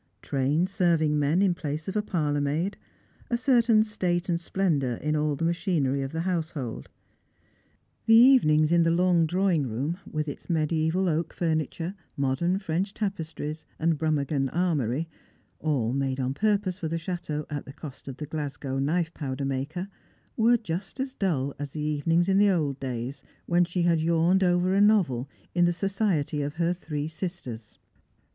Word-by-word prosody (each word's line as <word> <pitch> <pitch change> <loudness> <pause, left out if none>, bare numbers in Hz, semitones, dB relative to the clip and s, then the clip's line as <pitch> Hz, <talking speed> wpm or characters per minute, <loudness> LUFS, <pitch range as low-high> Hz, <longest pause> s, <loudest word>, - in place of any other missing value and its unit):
Trained 145 +6 +1
serving 170 -6 +2
men 150 +7 +2
in 190 -3 +3
place 155 -3 -5
of 190 - -4
a 210 - +2
parlour 150 -8 -1
maid; 155 +8 -1 0.5
a 235 - +1
certain 235 -4 +4
state 180 -4 -1
and 170 -1 0
splendour 155 -10 0
in 150 +5 -1
all 150 -1 +1
the 165 +4 -2
machinery 165 -6 0
of 135 0 -4
the 160 - -2
household. 160 -9 -3 1.2
The 225 - +7
even 250 - +7
ings 155 +1 +3
in 170 0 +5
the 165 - +3
long 170 -1 +3
drawing 180 -4 +1
room, 140 - -3
with 155 0 -2
its 145 - -7
media3val 160 +2 +1
oak 165 0 -1
furniture, 165 +1 -1 0.2
modern 140 +7 +1
French 190 +1 -2
tapestries, 160 -6 -4
and 160 -2 +1
Brummagem 145 -3 0
armoury, 160 -5 0 0.5
all 130 -7 0
mada 135 -1 -1
on 130 +1 -1
purpose 205 +1 0
for 165 - -2
the 165 +1 -2
chateau 160 -3 -4
at 145 -1 -4
the - - -9
cost 140 -3 -10
of 135 - -6
the 150 - -5
Glasgow 145 -3 -4
knife 160 +4 0
powder 135 -2 -4
maker, 140 +7 -3 0.5
were 235 +2 +4
just 195 +2 -5
as 265 0 -2
dull 140 - -1
as 145 -1 -5
the 155 - -4
evenings 155 +4 +1
in 195 0 +3
the 205 0 +5
old 150 -7 0
days, 125 0 -4 0.2
when 175 0 +3
she 175 0 -1
had 170 -2 +3
yawned 170 +3 +3
over 180 +1 +2
a 200 - +4
novel 170 - +3 0.2
in 175 0 +4
the 175 - +3
society 180 -5 0
of 145 +1 -3
her 170 +1 +1
three 150 -4 -4
sisters. 155 - -6
165 Hz, 170 wpm, -27 LUFS, 145-180 Hz, 1.2 s, The